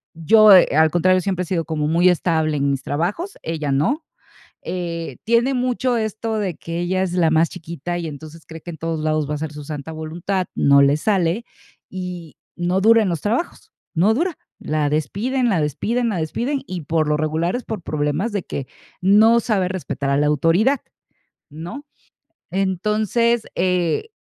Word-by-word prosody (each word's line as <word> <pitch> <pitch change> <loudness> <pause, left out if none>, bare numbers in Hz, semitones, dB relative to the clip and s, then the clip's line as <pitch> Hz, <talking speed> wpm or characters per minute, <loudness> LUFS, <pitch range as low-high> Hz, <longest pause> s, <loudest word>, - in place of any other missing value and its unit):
yo, 210 +5 +7
eh, 180 - +7
al 160 0 +4
contrario, 185 +2 +3
siempre 185 -1 -1
he - - -6
sido 170 -3 -1
como 155 -2 -2
muy 170 +3 +4
estable 160 -3 +1
en 140 0 +1
mis 135 -1 -3
trabajos, 195 - -3
ella 155 -3 -3
no. 245 - 0 0.6
Eh, 170 -2 -5
tiene 235 +4 +2
mucho 250 0 0
esto 220 0 -2
de 190 -6 -2
que 165 +1 -5
ella 185 +2 0
es 180 - -3
la 170 -3 +2
más 160 +1 +3
chiquita 170 0 -6
y, 170 - -4
entonces, 155 +2 -10
cree 160 -1 -10
que 175 - -8
en 160 - -9
todos 165 0 -3
lados 155 -1 0
va - - -1
a - - -1
hacer 150 0 -5
su 150 - -8
santa 150 +1 -6
voluntad, 170 +4 -3
no 140 0 +5
le 140 +2 +4
sale 190 +3 0 0.4
y 180 -4 -7 0.2
no 180 +2 0
dura 225 +1 +5
en 190 - 0
los 165 -4 -2
trabajos, 250 - -3 0.2
no 190 +7 +4
dura. 330 +6 -1 0.2
La 150 -1 -1
despiden, 230 - -1
la 175 -6 +1
despiden, 230 - -1
la 195 - -2
despiden 240 - -2
y, 180 -2 -5
por 155 +1 0
lo 150 - +2
regular, 160 +5 -1
es 250 - -4
por 215 -5 -5
problemas 155 +9 -1
de 200 -4 -2
que 135 -2 -5 0.3
no 215 +5 +5
sabe 200 -6 0
respetar 160 -6 -3
a 140 - +2
la 150 - +2
autoridad, 170 - +2 0.7
¿no? 175 - -8 0.6
Entonces, 210 +5 +1
eh, 180 - 0
175 Hz, 185 wpm, -21 LUFS, 155-215 Hz, 0.7 s, yo